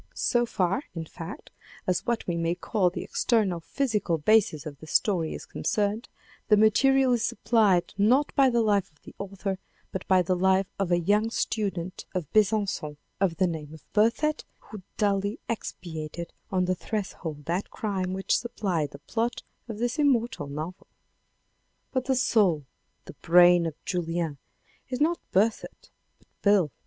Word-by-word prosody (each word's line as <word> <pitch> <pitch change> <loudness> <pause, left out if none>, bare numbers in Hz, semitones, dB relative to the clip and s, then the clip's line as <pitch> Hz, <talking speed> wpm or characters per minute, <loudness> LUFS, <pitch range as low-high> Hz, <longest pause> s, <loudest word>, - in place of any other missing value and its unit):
So 240 -1 +1
far, 190 +2 0
in 165 -1 -4
fact, 165 +1 -9 0.3
as 185 - -1
what 235 -1 0
we 175 - -1
may 170 +1 0
call 185 +1 +1
the 175 - -5
external 210 -8 +1
physical 210 - -1
basis 165 -3 +3
of 145 -2 -8
the 155 - -11
story 170 -1 +1
is - - -8
concerned, 210 +2 -1 0.4
the 210 - +5
material 260 +5 +4
is 235 -2 +1
supplied 210 -7 +2
not 255 +8 +3
by 275 -2 +5
the 235 -2 +2
life 205 -3 +2
of 150 - -33
the - - -12
author, 195 -1 -4 0.3
but 190 - -5
by 185 -1 +4
the 185 +1 +1
life 190 +1 +3
of 190 -3 0
a 175 - +4
young 205 +5 +2
student 190 -6 -3
of 180 -3 -1
Besancon, 200 -8 +1 0.2
of 190 -4 +1
the 185 - +3
name 160 -3 -4
of 150 - -16
Berthet, 235 +8 +2
who 210 -3 -11 0.2
duly 200 0 0
expiated 170 -6 -5 0.2
on 185 -1 +1
the 185 - +1
threshold 175 -7 -5
that 175 +4 -2
crime 190 -4 -2
which 190 +1 0
supplied 185 -10 -1
the - - -8
plot 235 +1 -2 0.3
of 220 - -5
this 240 +6 -2
immortal 255 - +1
novel. 155 +6 -6 1.0
But 260 -1 -1
the 265 - +1
soul, 195 - +2 0.4
the - - -10
brain 175 0 +6
of 160 - -5
Julien 165 -5 -2 0.5
is 255 - -3
not 335 +3 +2
Berthet 215 +4 0 0.3
but - - -30
Beyle. 200 -7 +4
195 Hz, 160 wpm, -27 LUFS, 170-225 Hz, 1.0 s, brain